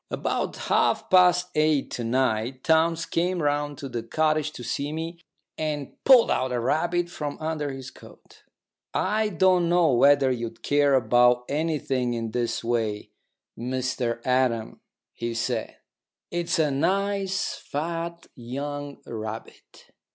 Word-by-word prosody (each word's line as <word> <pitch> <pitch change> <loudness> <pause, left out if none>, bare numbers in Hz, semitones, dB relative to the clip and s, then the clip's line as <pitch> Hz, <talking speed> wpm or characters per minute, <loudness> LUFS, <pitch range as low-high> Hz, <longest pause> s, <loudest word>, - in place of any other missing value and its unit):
About - - -2
half - - +1
past 180 -1 +5
eight 155 -2 +2
to 120 - -4
night 125 +1 0
Townes 165 +1 +2
came 180 +2 0
round 145 -1 -1
to 140 - -6
the 120 -3 -4
cottage 155 +5 0
to 120 - -8
see 140 +4 -3
me, 165 +2 -5 0.4
and 150 -3 -3
pulled 260 -3 +7
out 130 0 0
a 125 - 0
rabbit 170 +8 0
from 150 -4 -5
under 155 -2 -2
his 135 -1 -8
coat. - - -17 0.5
"I 215 0 +1
don't 180 -2 +3
know 175 -3 +4
whether 140 +1 +5
you'd 120 -2 -5
care 145 -1 +3
about 125 0 +4
anything 140 -5 -1
in 115 -1 -3
this 120 0 -2
way, 115 -3 -2 0.4
Mr 125 -1 -2
Adam," 125 -3 0 0.3
he 115 0 -4
said. 115 - -2 0.5
"It's 175 +1 -1
a 155 -3 +2
nice 195 +5 0
fat 170 +3 -4
young 140 +4 -6
rabbit." 110 -1 -8
145 Hz, 135 wpm, -25 LUFS, 125-165 Hz, 0.5 s, pulled